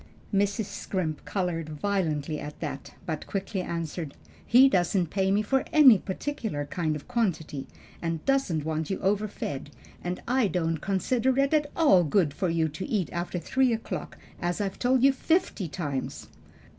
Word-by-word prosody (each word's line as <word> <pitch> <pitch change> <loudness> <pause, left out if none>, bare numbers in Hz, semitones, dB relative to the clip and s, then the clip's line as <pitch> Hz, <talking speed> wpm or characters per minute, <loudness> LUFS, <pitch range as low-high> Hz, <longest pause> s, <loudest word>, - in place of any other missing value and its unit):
Mrs. 200 +2 +1
Scrimp 185 -6 -3
colored 175 -5 -2
violently 155 -3 -1
at 150 0 -7
that, 140 -4 -6
but 155 -3 -4
quickly 195 0 -2
answered, 165 -3 -4 0.3
"He 255 +3 +7
doesn't 180 - +1
pay 195 +1 +2
for 265 +5 +1
any 265 -9 +8
particular 205 - -3
kind 155 +1 -1
or 150 - -5
quantity, 170 - -2 0.3
and 165 -2 -3
doesn't 225 - +1
want 160 -1 -2
you 195 - -1
overfed; 195 -9 -1 0.3
and 180 +1 -3
I 250 -2 +3
don't 165 -3 0
consider 235 - +1
it 275 +2 +3
at 300 -1 +2
all 285 - +5
good 155 -1 +2
for 185 - -1
you 165 -1 +2
to 155 +5 -5
eat 200 -7 0
after 175 +1 -2
three 255 +9 +2
o'clock, 225 - -5 0.2
as 175 +2 -1
I've 195 -2 -2
told 255 0 +3
you 275 0 +6
fifty 320 - 0
times." 145 -4 -4
185 Hz, 155 wpm, -27 LUFS, 160-225 Hz, 0.3 s, any